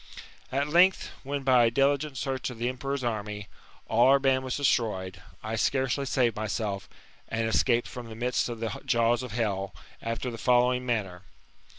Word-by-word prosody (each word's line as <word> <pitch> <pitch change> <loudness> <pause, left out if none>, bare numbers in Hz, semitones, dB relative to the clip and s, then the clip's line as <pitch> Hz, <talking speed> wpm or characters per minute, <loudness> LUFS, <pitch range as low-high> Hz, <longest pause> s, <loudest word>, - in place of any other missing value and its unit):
At 140 +2 0
length, 180 +5 +4
when, 140 0 -4
by 130 -3 +5
a - - +4
diligent 140 +3 +1
search 135 -1 -2
of 125 - -8
the 120 +2 -1
emperor's 135 +2 -3
army, 105 -3 -3 0.4
all 115 +3 +4
our 135 +1 +7
band 135 -1 +2
was 130 -1 -2
destroyed, 100 -9 0 0.2
I 110 +1 -3
scarcely 135 +4 0
saved 125 -3 +1
tnyself, 105 -2 -3 0.4
and 110 0 -1
escaped 120 +1 +2
from 120 -2 -8
the 115 -1 -2
jaws 120 +1 +2
of 125 -4 -7
hell, 100 -4 -2 0.3
after 115 +2 -3
the 115 - -8
following 125 +1 +2
manner. 100 -7 -2
120 Hz, 160 wpm, -28 LUFS, 110-130 Hz, 0.4 s, our